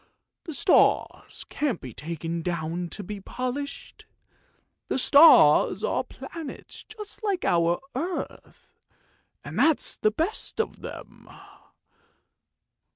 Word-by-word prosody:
The 320 - -4
stars - - +2
can't 285 -6 -1
be 125 -3 -9
taken 165 +3 -5
down 170 0 -3
to 205 - -7
be 205 +2 -7
polished! 255 +7 -6 0.8
The - - -1
stars 285 +5 +6
are - - 0
planets 325 -5 -9
just 430 0 -9
like 395 -4 -1
our 170 0 +2
own 340 +8 -2
earth, - - -22 0.7
and - - -6
that's 320 -2 +2
the 215 - +2
best 325 - -3
of 450 - -2
them!" - - -10
250 Hz, 110 wpm, -26 LUFS, -, 0.8 s, stars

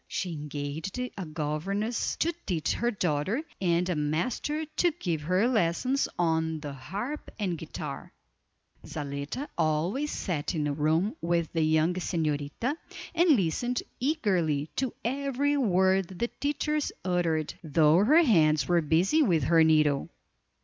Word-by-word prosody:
She 180 -2 -3
engaged 150 - -5
a 250 -7 -4
governess 170 +9 -2
to 335 +2 0
teach 160 -5 0
her 235 - 0
daughter, 190 - -1 0.2
and 175 -1 +2
a 180 - 0
master 215 - -1
to 350 - +4
give 170 - -3
her 185 +8 +2
lessons 250 +5 +1
on 160 -2 +1
the 145 -2 -6
harp 205 - -5
and 195 -5 -1
guitar. 155 -3 -7 0.7
Zaletta 145 - -5
always 170 - +1
sat 165 - -2
in 155 - 0
the 145 -1 0
room 160 +8 +1
with 170 -1 0
the 165 - +1
young 160 +2 +3
señorita, 160 - -1 0.4
and 340 +1 +3
listened 240 +7 -1 0.2
eagerly 185 - 0
to 260 -2 0
every 280 +2 0
word 190 -6 +3
the 235 +6 -1
teachers 295 +1 -1
uttered, 170 -4 0
though 155 +3 +4
her 310 +10 +6
hands 155 - +4
were 175 -1 +3
busy 170 - +3
with 175 - +3
her 165 +4 +5
needle. 150 -3 +3
175 Hz, 135 wpm, -28 LUFS, 155-235 Hz, 0.7 s, her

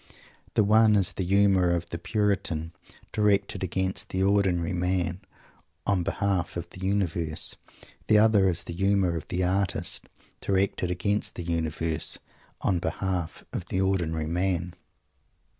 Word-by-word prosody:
The 110 - +5
one 110 +1 +5
is 95 -2 +2
the 95 - -2
humour 95 -1 +4
of 85 0 -1
the 85 - -4
Puritan, 90 -5 -1 0.4
directed 105 -2 +1
against 95 +1 -1
the 95 0 0
ordinary 95 -4 +2
man, 90 0 -1 0.6
on 100 -3 +2
behalf 95 0 -1
of 85 - -4
the - - -10
Universe. 90 -5 0 0.5
The 110 - +6
other 105 -3 +5
is 90 -1 -1
the 85 - -6
humour 95 -1 +2
of 80 - -5
the 90 0 -1
Artist, 95 +1 -1 0.3
directed 95 -2 0
against 100 +4 -1
the 85 - -5
Universe, 80 -1 -1 0.4
on 95 -3 +1
behalf 90 -2 -3
of 90 - -3
the 95 - -2
ordinary 85 -5 0
man. 90 +1 -1
95 Hz, 140 wpm, -27 LUFS, 85-100 Hz, 0.6 s, The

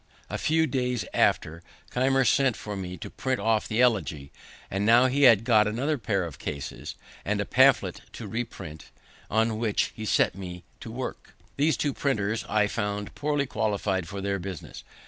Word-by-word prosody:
A - - -2
few 160 +1 +2
days 125 -4 -1
after, 80 +2 +1 0.3
Keimer 135 +1 +2
sent 130 -1 +3
for 105 -1 -6
me 90 -1 -5
to - - -7
print 130 -1 -2
off 110 +1 +1
the 115 +2 +1
Elegy. 80 - 0 0.4
And 100 +1 -1
now 115 +4 +6
he 135 +2 +3
had 115 -2 +5
got 110 -3 +4
another 135 +7 -1
pair 100 -4 0
of 85 -4 -7
cases, 70 -2 -6 0.3
and - - -1
a - - 0
pamphlet - - +4
to - - -7
reprint, 110 -9 -6 0.4
on 110 0 +1
which 110 -3 0
he 110 - -6
set - - +3
me 90 -2 -8 0.2
to - - -8
work. 125 +2 -6 0.2
These 150 +3 +2
two 145 -2 0
printers 110 -6 -1
I 105 -1 +3
found 105 -1 -3
poorly 145 -1 0
qualified 100 -6 -1
for 100 0 -6
their 100 0 -1
business. 90 -2 -7
110 Hz, 175 wpm, -27 LUFS, 100-125 Hz, 0.4 s, now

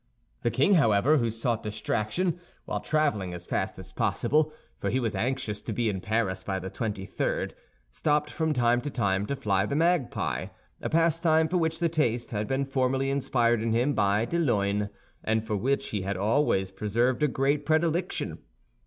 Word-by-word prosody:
The - - +1
king, 205 - +3
however, 135 - +4
who 115 -2 +1
sought 115 0 -1
distraction, 110 - -1 0.3
while - - -2
traveling 125 -13 0
as 90 0 -9
fast - - -2
as - - -9
possible—for 155 +1 -1
he 130 - +1
was 115 -4 -1
anxious 125 -4 -2
to 110 - -4
be 115 0 +1
in 95 -3 -3
Paris 105 -4 -1
by 95 0 -2
the 95 0 -6
twenty 105 -4 -3
third—stopped 145 - -2
from 160 -1 0
time 120 -3 +2
to 145 - -4
time 100 -6 0
to 140 - -1
fly 100 -7 +1
the 125 - -2
magpie, 165 -5 +1 0.3
a - - -2
pastime 165 -1 +3
for 180 - 0
which 160 -1 0
the 170 0 +1
taste 125 -8 0
had 105 -1 -2
been 135 +1 0
formerly 135 0 0
inspired 120 -4 +2
in 115 0 0
him 125 +5 +2
by 105 -1 +2
de 170 +7 -1
Luynes, 105 -8 +1 0.3
and 110 0 0
for 110 -1 -1
which 135 +7 0
he 105 - -2
had 95 0 -2
always 100 -2 +1
preserved 115 +7 0
a 150 - +4
great 140 +2 +1
predilection. 160 +3 0
120 Hz, 180 wpm, -27 LUFS, 105-150 Hz, 0.3 s, however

